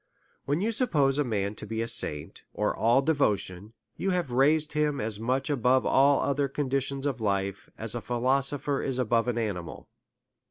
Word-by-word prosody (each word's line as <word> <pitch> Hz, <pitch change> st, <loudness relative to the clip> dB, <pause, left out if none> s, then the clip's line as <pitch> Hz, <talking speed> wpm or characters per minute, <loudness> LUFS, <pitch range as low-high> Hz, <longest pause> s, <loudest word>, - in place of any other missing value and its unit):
When 145 Hz, +5 st, 0 dB
you 220 Hz, +3 st, 0 dB
suppose 150 Hz, -, +2 dB
a -, -, +3 dB
man 105 Hz, -5 st, -2 dB
to 105 Hz, -, -8 dB
be 110 Hz, +1 st, -4 dB
a -, -, -4 dB
saint, 75 Hz, -9 st, +1 dB
or -, -, 0 dB
all 120 Hz, +4 st, +3 dB
devotion, 105 Hz, -, -1 dB, 0.2 s
you 195 Hz, -, -1 dB
have 180 Hz, -8 st, -1 dB
raised 150 Hz, +5 st, +2 dB
him 150 Hz, -2 st, 0 dB
as 105 Hz, -1 st, -3 dB
much 130 Hz, +4 st, -1 dB
above 130 Hz, -3 st, +2 dB
all 140 Hz, +1 st, +4 dB
other 140 Hz, 0 st, 0 dB
conditions 135 Hz, 0 st, -2 dB
of 135 Hz, -4 st, -2 dB
life, 100 Hz, -1 st, -2 dB
as 110 Hz, -1 st, +1 dB
a 120 Hz, -, -4 dB
philosopher 135 Hz, +4 st, -1 dB
is 130 Hz, -2 st, -2 dB
above 115 Hz, -1 st, +1 dB
an 120 Hz, -1 st, -1 dB
animal. 100 Hz, -7 st, -4 dB
130 Hz, 175 wpm, -27 LUFS, 110-145 Hz, 0.2 s, all